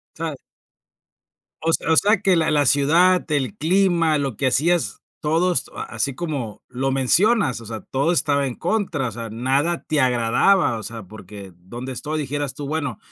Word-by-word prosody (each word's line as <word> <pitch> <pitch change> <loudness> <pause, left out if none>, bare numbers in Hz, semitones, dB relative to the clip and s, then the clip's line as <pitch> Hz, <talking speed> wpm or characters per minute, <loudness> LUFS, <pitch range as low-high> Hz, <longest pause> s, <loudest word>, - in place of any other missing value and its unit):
Sabes 160 -4 -5 1.2
O 165 - +1
s - - +5
o 160 - +3
sea, 205 -1 +3
que 190 -3 +3
la 160 -1 +2
la 145 -1 +3
ciudad, 165 +6 +3
el 145 +5 0
clima, 170 -3 +2
lo 135 -6 -2
que 135 - +1
hacías 150 -3 +1 0.2
todos 165 +4 0
a - - -4
así 140 -2 -1
como 135 - -5
lo 130 +2 -2
mencionas, 135 - +2
o 115 - -11
sea, 110 -1 -6
todo 140 +6 0
estaba 140 -4 +1
en 125 - -4
contra, 175 - -1
o - - -5
sea, 115 +1 -7
nada 135 +9 0
te 155 -2 0
agradaba, 125 - +2
o - - -7
sea, 115 0 -7
porque 100 -1 -11
donde 120 +9 -8
estoy, 155 +5 -4
dijeras 145 -1 -3
tú, 145 - -6
bueno, 140 -7 -3
145 Hz, 180 wpm, -21 LUFS, 125-165 Hz, 1.2 s, s